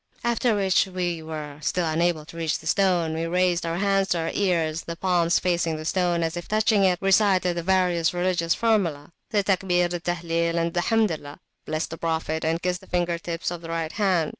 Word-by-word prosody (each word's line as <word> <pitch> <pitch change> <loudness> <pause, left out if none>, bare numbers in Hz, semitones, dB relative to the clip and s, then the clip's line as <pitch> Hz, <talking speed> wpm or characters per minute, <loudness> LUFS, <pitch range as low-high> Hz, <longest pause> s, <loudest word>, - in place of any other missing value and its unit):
After 235 -1 +1
which, 195 -2 +2
as 190 - -13
we 175 -3 -2
were 155 -2 -7
still 175 +3 0
unable 160 0 0
to 165 - -13
reach 165 -2 -1
the - - -15
stone, 175 -2 +2
we 165 +1 -2
raised 175 -1 +1
our 165 +1 -2
hands 195 0 +2
to 175 - 0
our 165 0 -2
ears, 170 -5 0
the 170 - -5
palms 175 -1 +2
facing 170 -2 0
the 155 - -7
stone, 175 -1 +1
as 165 +1 -2
if 175 - -6
touching 215 -1 +2
it, 180 -1 +3
recited 190 -2 +3
the 170 - -2
various 180 -2 +2
religious 175 -2 0
formulae, 175 -10 0 0.2
the 210 -3 +1
Takbir, 180 -2 +1
the 175 - -2
Tahlil, 170 -1 -1
and 170 0 0
the 175 - +1
Hamdilah, 175 -9 0 0.3
blessed 155 +1 -2
the 165 - -7
Prophet, 160 -1 -2
and 165 +1 -1
kissed 180 +1 -1
the 190 - -16
finger 175 -1 -1
tips 170 0 -4
of 175 -1 -6
the 165 - -9
right 165 -1 -2
hand. 185 -7 +1
175 Hz, 215 wpm, -24 LUFS, 165-185 Hz, 0.3 s, it